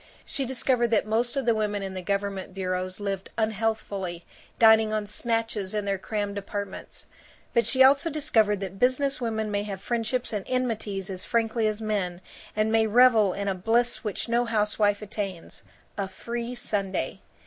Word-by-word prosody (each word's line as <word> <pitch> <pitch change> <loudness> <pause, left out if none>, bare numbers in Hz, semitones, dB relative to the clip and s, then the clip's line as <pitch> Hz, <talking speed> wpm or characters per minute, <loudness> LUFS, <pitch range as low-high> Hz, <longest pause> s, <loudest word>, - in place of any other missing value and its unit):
She 275 - -3
discovered 250 -1 +2
that 225 -3 +2
most 230 +4 0
of 270 - 0
the 235 - +4
women 210 -2 -1
in 190 -1 -5
the 185 - -4
government 200 0 -2
bureaus 185 0 -2
lived 195 -2 -3
unhealthfully, 210 -5 -2 0.3
dining 220 -1 +6
on 215 -1 -1
snatches 225 -2 -2
in 210 -1 -1
their 195 -1 -1
crammed 205 0 -3
apartments. 200 0 -6 0.5
But 235 - +3
she 260 0 +5
also 275 +4 +5
discovered 220 -9 +2
that 195 0 -6
business 260 +2 +2
women 220 -2 -1
may 205 0 0
have 200 -2 -5
friendships 235 +3 -1
and 205 -2 -2
enmities 220 -6 -2
as 185 -1 -6
frankly 225 -1 +1
as 215 +1 -2
men 190 -5 -1 0.4
and 215 +1 +1
may 225 0 +4
revel 225 -4 +5
in 200 0 -3
a 195 - +1
bliss 230 +6 +1
which 210 -3 -3
no 235 +1 +2
housewife 210 -2 +1
attains 195 -4 -5 0.4
a 195 - 0
free 235 +5 -5
Sunday. 200 -5 -2
215 Hz, 170 wpm, -26 LUFS, 200-235 Hz, 0.5 s, dining